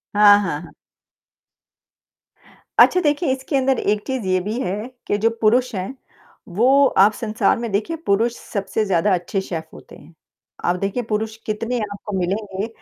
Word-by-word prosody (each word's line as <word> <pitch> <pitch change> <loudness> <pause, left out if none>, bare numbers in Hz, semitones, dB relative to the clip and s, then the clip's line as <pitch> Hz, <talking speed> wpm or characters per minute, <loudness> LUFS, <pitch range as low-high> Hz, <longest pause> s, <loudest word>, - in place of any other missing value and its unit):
हाँ, 205 -1 +8
हाँ, 165 -7 -2
हाँ। 170 - -12 2.1
अच्छा, 365 - +7
देखें 295 +2 +1
इसके 265 +2 -3
अंदर 265 -1 +1
एक 210 0 0
चीज़ 260 -5 -3
ये 185 0 +2
भी 215 +6 -3
है, 205 +4 -3 0.2
के 205 - +1
जो 225 +2 +2
पुरुष 245 +3 +3
हैं, 190 +8 -4 0.5
वो 255 +9 +4
आप 200 +3 +7
संसार 220 +1 0
में 235 -3 -4
देखिए 215 +12 -1
पुरुष 230 +4 +1
सबसे 200 +1 -3
ज़्यादा 195 +1 +2
अच्छे 180 +2 -1
शेफ़ 165 -4 -5
होते - - -13
हैं। 155 +4 -17 0.5
आप 175 - +2
देखिए 200 +5 -2
पुरुष 220 +1 -2
कितने 230 +3 -2
आपको 205 -1 -5
मिलेंगे, 195 +2 -2
210 Hz, 160 wpm, -21 LUFS, 195-240 Hz, 2.1 s, हाँ